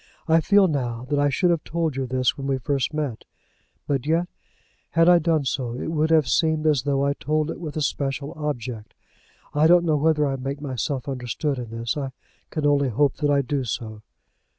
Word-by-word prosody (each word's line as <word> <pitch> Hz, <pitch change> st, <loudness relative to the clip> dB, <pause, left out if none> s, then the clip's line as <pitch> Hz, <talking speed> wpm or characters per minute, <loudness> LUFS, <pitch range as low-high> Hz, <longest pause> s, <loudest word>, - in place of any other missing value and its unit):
I 165 Hz, 0 st, +4 dB
feel 200 Hz, +3 st, +5 dB
now 125 Hz, -6 st, -2 dB
that 145 Hz, -, +2 dB
I 145 Hz, 0 st, +3 dB
should 175 Hz, +5 st, +2 dB
have 165 Hz, -3 st, 0 dB
told 165 Hz, -3 st, -2 dB
you 135 Hz, -1 st, -2 dB
this 130 Hz, 0 st, +1 dB
when 135 Hz, -1 st, -5 dB
we 135 Hz, -1 st, +1 dB
first 135 Hz, +1 st, -1 dB
met; 150 Hz, -7 st, -3 dB, 0.6 s
but 140 Hz, -1 st, -1 dB
yet, 165 Hz, +3 st, +2 dB, 0.6 s
had 165 Hz, 0 st, +3 dB
I 175 Hz, -1 st, +7 dB
done 160 Hz, -3 st, +1 dB
so, 125 Hz, -2 st, -2 dB
it 145 Hz, -, -4 dB
would 155 Hz, 0 st, +1 dB
have 160 Hz, -3 st, +4 dB
seemed 160 Hz, -1 st, +1 dB
as 150 Hz, -4 st, +3 dB
though 140 Hz, 0 st, 0 dB
I 140 Hz, -, +2 dB
told 155 Hz, +2 st, -1 dB
it -, -, -7 dB
with 155 Hz, -3 st, -6 dB
a 155 Hz, -, 0 dB
special 140 Hz, 0 st, -2 dB
object. 125 Hz, -7 st, -5 dB, 0.6 s
I 150 Hz, +2 st, +4 dB
don't 175 Hz, +1 st, +5 dB
know 155 Hz, -2 st, +2 dB
whether 150 Hz, 0 st, +2 dB
I 135 Hz, -1 st, -1 dB
make 135 Hz, +2 st, -4 dB
myself 135 Hz, -1 st, -3 dB
understood 135 Hz, +2 st, -2 dB
in 120 Hz, -2 st, -6 dB
this. 115 Hz, 0 st, -3 dB
I 135 Hz, -2 st, -4 dB, 0.4 s
can 155 Hz, -2 st, -3 dB
only 140 Hz, -2 st, +3 dB
hope 135 Hz, +4 st, +1 dB
that 145 Hz, -1 st, 0 dB
I 140 Hz, -1 st, +3 dB
do 135 Hz, +1 st, -1 dB
so. 110 Hz, -2 st, -5 dB
145 Hz, 210 wpm, -24 LUFS, 130-155 Hz, 0.6 s, I